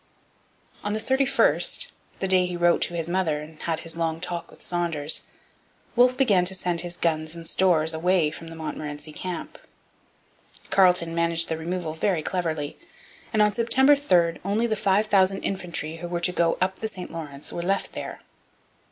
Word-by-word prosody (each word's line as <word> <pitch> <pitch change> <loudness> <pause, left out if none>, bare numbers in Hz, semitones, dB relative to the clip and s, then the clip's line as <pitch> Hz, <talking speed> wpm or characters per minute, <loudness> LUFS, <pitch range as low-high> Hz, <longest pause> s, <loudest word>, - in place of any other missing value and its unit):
On 205 - -1
the 215 - -1
31st, 270 - +2 0.3
the 190 - -2
day 185 -1 +4
he 180 -1 -4
wrote 175 0 +3
to 175 - 0
his 165 -1 -1
mother 170 -4 0
and 155 +1 -11
had 165 -2 -2
his 165 0 -6
long 165 -1 -1
talk 175 -1 -4
with - - -16
Saunders, 165 -4 -1 0.7
Wolfe 250 +1 +5
began 210 -9 +4
to 190 +1 +3
send 175 -2 -1
his 175 0 -5
guns 155 -1 -1
and 165 -1 -6
stores 165 -4 +3
away 165 -1 +2
from 165 +1 -9
the 165 - -8
Montmorency 150 -1 -6
camp. 180 +1 -6 1.1
Carleton 180 -3 +4
managed 170 0 +1
the 160 - -1
removal 170 -1 -3
very 160 0 0
cleverly; 160 -5 -2 0.5
and 215 -2 +4
on 210 0 +2
September 265 +5 +5
3 175 -12 +2
only 205 +5 +1
the 220 -2 0
five 200 +1 +2
thousand 195 -2 +3
infantry 170 -4 -3
who 175 +1 -6
were 175 0 -2
to 175 +1 +2
go 170 -2 +1
up 190 +1 0
the 220 - -2
St 185 -4 -8
Lawrence 150 -4 -5
were 170 - -3
left 195 +3 -1
there. - - -6
175 Hz, 180 wpm, -25 LUFS, 165-190 Hz, 1.1 s, Wolfe